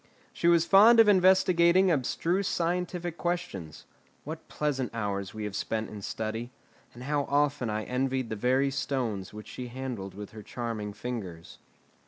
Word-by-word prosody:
She 170 - 0
was 170 -1 +5
fond 220 +5 +7
of 225 - +8
investigating 185 -2 +5
abstruse 170 +7 0
scientific 175 0 -2
questions. 175 - -4 0.4
What 160 +2 -7
pleasant 135 -4 -2
hours 100 -2 -3
we 110 - -5
have 105 -1 -4
spent 110 0 -3
in 105 -1 -8
study; 110 +3 -4 0.5
and 120 - -9
how 145 +1 0
often 145 -4 +1
I 110 0 -2
envied 130 0 -1
the - - -1
very 130 +5 +2
stones 125 -8 -2
which 105 0 -10
she 125 +2 -7
handled 120 -7 -6
with 105 0 -8
her 110 - -9
charming 110 -2 -5
fingers. 100 -7 -7
130 Hz, 155 wpm, -28 LUFS, 110-170 Hz, 0.5 s, of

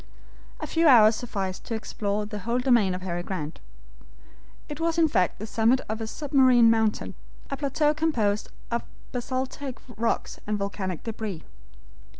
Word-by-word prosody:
A - - -3
few 330 0 +2
hours 225 -5 +7
sufficed 195 -6 -4
to 230 - -3
explore 210 -1 -2
the 210 0 -6
whole 235 +5 -1
domain 240 -7 +3
of 185 - -7
Harry 175 -2 -3
Grant. 165 -4 -5 1.1
It 295 - -7
was 330 0 0
in 330 -1 +5
fact 185 - +1
the 215 - -6
summit 225 +3 +2
of 220 +1 -3
a 220 - -3
submarine 255 -3 +4
mountain, 220 -1 0 0.4
a 275 - -2
plateau 295 +1 +1
composed 235 -10 0 0.2
of 235 - -1 0.3
basaltic 260 +1 -3 0.2
rocks 230 +1 -1
and 210 0 0
volcanic 195 -3 -4
DEBRIS. 215 -6 -5
225 Hz, 155 wpm, -26 LUFS, 205-260 Hz, 1.1 s, hours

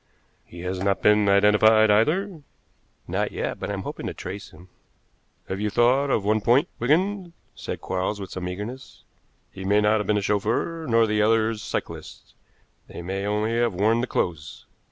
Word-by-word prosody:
"He 85 - -12
has 90 +1 -4
not 100 +1 0
been 105 -1 +4
identified 105 +2 +5
either?" 160 - +1 0.7
"Not - - -1
yet, - - -4
but - - -5
I'm - - -4
hoping - - -6
to - - -5
trace 100 +2 -7
him." 90 +4 -16 0.8
"Have 95 +2 -4
you 105 - 0
thought 125 +6 +2
of 110 -6 0
one 110 +1 +2
point, 125 +7 +3
Wigan?" 175 - 0 0.2
said - - -6
Quarles, 95 +3 -2
with 95 -2 -7
some 90 -1 -4
eagerness. 105 +8 -8 0.5
"He 95 - -9
may 100 +2 +3
not 105 +1 +3
have 105 - -4
been 105 - +2
a - - 0
chauffeur, 115 - -1
nor 115 0 +4
the 105 -1 0
others 110 0 +2
cyclists. - - -6 0.5
They - - -9
may 95 +3 -3
only 105 +2 0
have 120 -5 +1
worn 110 +5 +2
the 125 - -2
clothes." 80 - -3
105 Hz, 175 wpm, -24 LUFS, 100-120 Hz, 0.8 s, identified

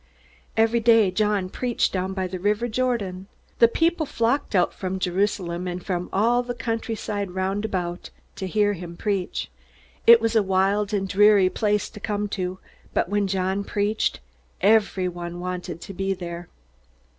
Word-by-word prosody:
Every 225 +1 +3
day 225 -4 +5
John 210 -1 +1
preached 240 +5 -1
down 190 0 -1
by 190 -1 -1
the 185 0 -5
river 210 +5 +1
Jordan. 215 -6 -2 0.3
The 230 - +8
people 325 +5 +1
flocked 235 0 0
out 180 -2 +3
from 190 0 -4
Jerusalem 180 -1 -1
and 180 0 -5
from 180 -2 -2
all 235 +5 +3
the 245 0 -5
countryside 225 -3 -3
round 195 +3 -1
about 175 -4 -3 0.3
to 190 - -3
hear 205 +2 +2
him 170 -2 -8
preach. 195 -3 -2 0.6
It 235 0 +10
was 225 0 0
a 220 - +6
wild 195 +2 +1
and 195 -2 0
dreary 200 -1 +5
place 210 -2 0
to 210 - -10
come 210 0 -2
to, 185 -2 -3 0.4
but - - +1
when 205 0 +1
John 190 +1 -1
preached 205 - -1 0.4
everybody 185 -4 +1
wanted 180 -1 -5
to 195 - -8
be 195 +1 -1
there. 175 -1 -7
200 Hz, 155 wpm, -24 LUFS, 185-220 Hz, 0.6 s, It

